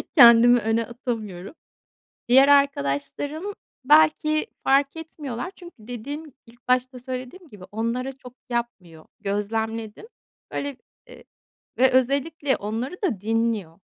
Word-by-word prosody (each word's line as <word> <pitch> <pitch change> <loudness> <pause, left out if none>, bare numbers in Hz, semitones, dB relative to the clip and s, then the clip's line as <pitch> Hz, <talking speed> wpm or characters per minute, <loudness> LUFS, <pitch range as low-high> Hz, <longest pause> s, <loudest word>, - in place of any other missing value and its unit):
kendimi 240 -2 +8
öne 225 +1 0
atamıyorum. 225 - -6 0.7
Diğer 265 +3 +6
arkadaşlarım 280 - +1 0.3
belki 310 - +4 0.2
fark 275 +2 +3
etmiyorlar 315 -1 -6
çünkü 350 -1 -12
dediğim 260 +6 -7
ilk 240 +1 -21
başta 255 0 +1
söylediğim 255 +7 -7
gibi 200 -3 -13
onlara 235 +5 -2
çok 250 -2 -13 0.2
yapmıyor, 200 -10 -5
gözlemledim. 220 - -3 0.4
Böyle, 285 -2 -4 0.3
eee, - - -14 0.5
ve 260 +1 +5
özellikle 280 +3 +1
onları 225 - -4
da 230 - -1
dinliyor, 220 -6 -1
245 Hz, 110 wpm, -24 LUFS, 225-285 Hz, 0.7 s, kendimi